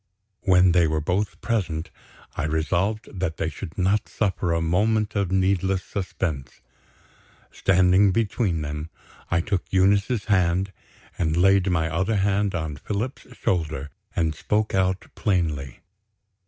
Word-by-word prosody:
When 90 -1 +5
they 85 -1 +4
were 80 0 0
both 90 +7 -1
present, 90 -9 -2 0.4
I - - -2
resolved 85 +8 0
that 85 -3 -2
they 80 - -1
should 80 0 -8
not 95 +3 +1
suffer 95 -4 -1
a 85 - +1
moment 105 +6 +1
of 100 -3 0
needless 95 0 +1
suspense. 85 -8 -4 0.9
Standing 95 +1 +4
between 100 -5 0
them, 75 +2 -5 0.4
I 85 0 +2
took 95 0 -2
Eunice's 100 +4 +2
hand, 95 -1 +2 0.5
and 80 -1 +1
laid 95 +1 +4
my 80 -3 +1
other 95 +7 0
hand 100 0 +1
on 80 -4 -3
Philip's 105 - -4
shoulder, 75 -5 -1 0.2
and 80 -5 +1
spoke 105 +6 -1
out 95 0 +1
plainly. 80 - -1
95 Hz, 130 wpm, -24 LUFS, 80-100 Hz, 0.9 s, When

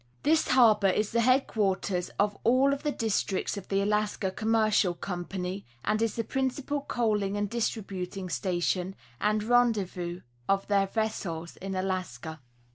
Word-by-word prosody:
This 315 +1 +3
harbor 225 -6 +5
is 210 +3 +1
the 235 0 +2
headquarters 205 -7 +1
of 205 0 +2
all 260 +4 +4
of 280 - -4
the 295 - 0
districts 215 -6 -1
of 200 - -7
the 195 0 +1
Alaska 210 -1 0
Commercial 215 -3 +2
Company, 180 +1 -4 0.2
and 215 +1 +1
is 225 -2 0
the 230 - -1
principal 265 +4 -2
coaling 210 -6 0
and 205 0 0
distributing 195 -4 -3
station 180 +1 -1 0.2
and 210 +4 +1
rendezvous 205 -7 +1 0.3
of 195 0 +2
their 200 -1 +3
vessels 190 -6 -3
in 195 0 -5
Alaska. 180 -6 -3
205 Hz, 140 wpm, -28 LUFS, 185-225 Hz, 0.3 s, harbor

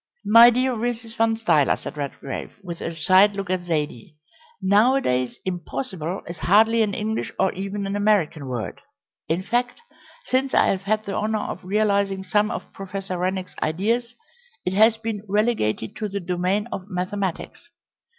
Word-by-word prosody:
"My 230 +2 +9
dear 255 +2 +1
Mrs. 230 0 -3
Van 225 0 +2
Stuyler," 165 -10 +3
said - - -8
Redgrave, 140 -1 -5
with 170 -2 -7
a 165 - -4
side 190 +5 +5
look 195 -2 -4
at 185 - +1
Zaidie, 150 -4 -3 0.4
"nowadays 200 - +2
'impossible' 185 - -4
is 170 0 -7
hardly 220 +8 +4
an 205 -3 0
English 220 +1 -2
or 190 - +2
even 195 +2 -4
an 195 +1 -2
American 200 -9 +1
word. 125 -3 -5 0.5
In 170 +4 -1
fact, 245 - -1 0.5
since 265 - 0
I - - +4
have 190 - 0
had 215 +2 0
the 200 - -4
honour 215 0 -1
of - - -6
realising 200 -1 +1
some 210 +3 +1
of - - -6
Professor 195 -1 -5
Rennick's 185 +1 -2
ideas 225 +9 0 0.5
it 180 - 0
has 220 +3 +5
been 220 -2 -4
relegated 205 - 0
to 215 - -3
the 200 +1 -3
domain 180 +3 -1
of 195 +1 -6
mathematics. 185 0 -4
195 Hz, 160 wpm, -23 LUFS, 180-220 Hz, 0.5 s, My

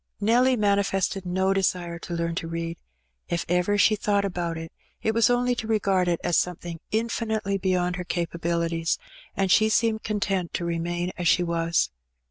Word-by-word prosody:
Nelly 245 +5 +4
manifested 200 -3 +1
no 190 +2 +1
desire 175 -3 -1
to 170 - -5
learn 170 0 -1
to 165 - -3
read. 165 0 -4 0.5
If 170 0 -1
ever 180 +4 +2
she 215 +1 +5
thought 205 -1 +1
about 175 -3 -2
it, 165 0 -7 0.3
it 220 - +1
was 230 0 +4
only 245 0 +2
to 225 -2 -4
regard 195 -4 +2
it 170 -1 +1
as 175 -2 +3
something 175 -1 -4
infinitely 220 -3 -1
beyond 180 -1 0
her 180 - -3
capabilities; 170 -1 -1 0.4
and 195 -1 +1
she 215 +2 +5
seemed 220 0 +2
content 195 -4 -1
to 170 - -2
remain 175 +1 -2
as 175 - 0
she 175 - +4
was. 170 - +1
180 Hz, 170 wpm, -25 LUFS, 170-205 Hz, 0.5 s, she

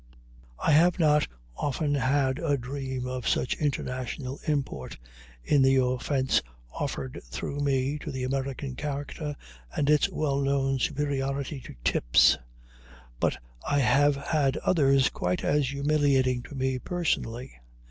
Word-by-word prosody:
I - - +1
have 170 +4 +5
not 150 -3 +3 0.3
often 145 - -1
had 135 0 +1
a 145 -4 +1
dream 130 0 -4
of 125 -1 -4
such - - +1
international 130 -1 -3
import, 135 - -2 0.5
in 145 - +3
the 135 0 +5
offense 130 +1 +1 0.3
offered 65 -2 -4
through 100 - -5
me 140 0 0
to 155 - -6
the 130 -2 -4
American 135 0 -3
character 145 +1 -4 0.4
and 145 +1 +3
its 150 - +4
well 140 -3 -1
known 135 -1 +1
superiority 140 0 -1
to - - -11
tips, - - +4 0.8
but - - +1 0.3
I 145 - 0
have 145 +1 +4
had 140 -1 0
others 140 -6 +3
quite 90 0 -2
as 145 -1 +2
humiliating 140 -3 +2
to 145 - -9
me 130 -1 -1
personally. 130 -7 -2
140 Hz, 130 wpm, -27 LUFS, 130-145 Hz, 0.8 s, have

